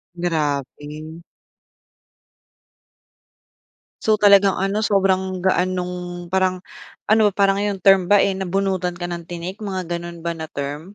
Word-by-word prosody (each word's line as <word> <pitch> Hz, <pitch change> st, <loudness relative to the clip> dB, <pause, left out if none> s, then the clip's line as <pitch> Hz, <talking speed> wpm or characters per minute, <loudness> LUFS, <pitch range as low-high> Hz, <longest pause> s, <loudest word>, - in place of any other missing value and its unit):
Grabe. 155 Hz, -1 st, -3 dB, 2.8 s
So, 215 Hz, -1 st, +2 dB
talagang 200 Hz, -1 st, +5 dB
ano, 195 Hz, +3 st, 0 dB
sobrang 190 Hz, -2 st, +1 dB
gaan 185 Hz, 0 st, +1 dB
nung 180 Hz, -1 st, -5 dB
parang 185 Hz, +1 st, 0 dB, 0.5 s
ano 215 Hz, 0 st, +4 dB
parang 195 Hz, 0 st, +1 dB
yung 205 Hz, -1 st, -1 dB
term 190 Hz, -1 st, +4 dB
ba, 205 Hz, -, +6 dB
eh, 195 Hz, 0 st, +2 dB
nabunutan 190 Hz, -1 st, -2 dB
ka 175 Hz, -, -4 dB
ng 170 Hz, -1 st, -6 dB
tinik, 175 Hz, +4 st, -6 dB
mga 190 Hz, -3 st, -4 dB
gano'n 170 Hz, 0 st, -7 dB
ba 170 Hz, -, -1 dB
na 160 Hz, -1 st, -7 dB
term? 140 Hz, +2 st, -5 dB
185 Hz, 125 wpm, -21 LUFS, 170-195 Hz, 2.8 s, ba